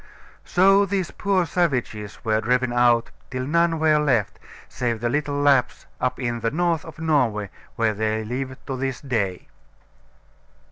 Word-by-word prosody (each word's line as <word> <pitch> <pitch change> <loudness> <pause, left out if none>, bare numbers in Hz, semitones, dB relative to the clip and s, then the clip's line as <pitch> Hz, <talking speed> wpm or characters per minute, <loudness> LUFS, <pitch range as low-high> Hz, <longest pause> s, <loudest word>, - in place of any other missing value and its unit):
So 195 +2 +4
these 190 -2 -2
poor 195 -3 +1
savages 130 - -2
were 110 0 +2
driven 125 +1 +1
out, 120 -1 +3 0.2
till 130 0 -3
none 170 +3 +2
were 155 -1 +3
left, 120 -9 0 0.3
save 120 -2 -2
the 120 +1 -1
little 145 +1 -1
Lapps 140 -3 +2
up 125 0 -1
in 120 -2 -2
the 115 - 0
north 165 +2 0
of 160 - -11
Norway, 125 - 0 0.2
where 110 -2 +1
they 110 +1 -1
live 130 +3 -4
to 135 - -4
this 135 0 -3
day. 105 -10 -2
130 Hz, 150 wpm, -23 LUFS, 115-155 Hz, 0.3 s, So